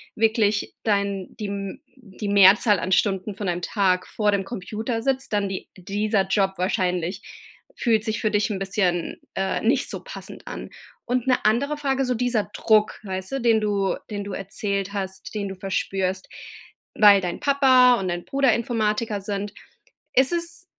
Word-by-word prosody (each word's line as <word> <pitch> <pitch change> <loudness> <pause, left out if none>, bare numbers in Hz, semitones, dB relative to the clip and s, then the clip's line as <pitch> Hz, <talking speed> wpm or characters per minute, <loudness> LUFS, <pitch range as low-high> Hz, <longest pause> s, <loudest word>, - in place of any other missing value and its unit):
wirklich 215 -2 +1
dein 200 -3 -1
die 210 - -3
m 200 +6 -5
die 210 -4 -8
Mehrzahl 200 +1 +6
an 185 - -3
Stunden 195 0 +1
von 200 -1 -4
deinem 175 0 -1
Tag 185 -4 +1
vor 210 -1 0
dem 200 -1 0
Computer 225 +3 -4
sitzt, 265 -2 -1
dann 205 -1 +1
die 190 - -5
dieser 200 +1 0
Job 195 -1 +1
wahrscheinlich 180 -1 -1 0.5
fühlt 220 -3 +1
sich 220 -2 -2
für 215 - +1
dich 210 +1 +1
'n 195 - -3
bisschen, 185 -3 -1 0.2
äh, 190 0 -1
nicht 250 +4 +2
so - - -5
passend - - -10
an. - - -7 0.4
Und 250 0 -1
'ne 255 - +2
andere 275 +8 +1
Frage, 270 -2 0
so 250 - 0
dieser 235 -3 0
Druck, 215 -1 +2
weißt 190 +1 -5
du, 270 - -1
den 230 -2 +3
du 200 -2 0 0.2
den 205 -1 -3
du 200 - -6
erzählt 200 +1 -3
hast, 190 -1 -5
den 205 -2 -3
du 190 - -6
verspürst, 190 0 -2 0.7
weil 205 -2 +7
dein 175 -1 -4
Papa 260 -4 +5
und 185 -2 -2
dein 175 0 -4
Bruder 270 -4 +2
Informatiker 220 -2 -1
sind. 200 0 -4 0.6
Ist 260 +3 +4
es 340 +1 -1
205 Hz, 170 wpm, -24 LUFS, 195-230 Hz, 0.7 s, weil